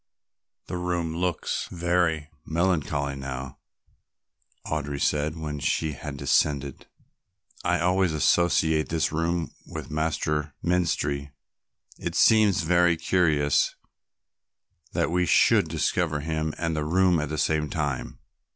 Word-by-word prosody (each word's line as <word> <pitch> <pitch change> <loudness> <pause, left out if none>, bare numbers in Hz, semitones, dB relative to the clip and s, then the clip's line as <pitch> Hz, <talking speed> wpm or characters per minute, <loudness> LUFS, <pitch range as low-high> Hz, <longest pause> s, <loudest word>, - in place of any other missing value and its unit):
"The 90 - -4
room 85 -2 -2
looks 90 -1 -2
very 85 -3 0
melancholy 80 -5 0
now," 65 -1 -6 1.1
Audry 75 -2 -3
said 75 +3 0
when 75 -2 -4
they 80 +3 0
had 70 0 -7
descended. 70 -1 0 0.8
"I - - +1
always 90 0 +2
associate 80 0 +2
this 80 -1 0
room 80 +1 -1 0.2
with - - -7
Master 75 -1 -1
Menstrie. 75 -5 0 0.7
It - - -4
seems 105 -6 +4
very 85 0 +3
curious 80 -4 +2 1.2
that 80 -3 0
we 90 0 +1
should - - +4
discover 80 -5 0
him 80 0 -2
and 80 -1 -1
the 75 - -1
room 90 +2 +3
at 75 -1 -3
the 75 - -3
same 75 0 +1
time." 70 -5 -3
80 Hz, 115 wpm, -26 LUFS, 75-85 Hz, 1.2 s, seems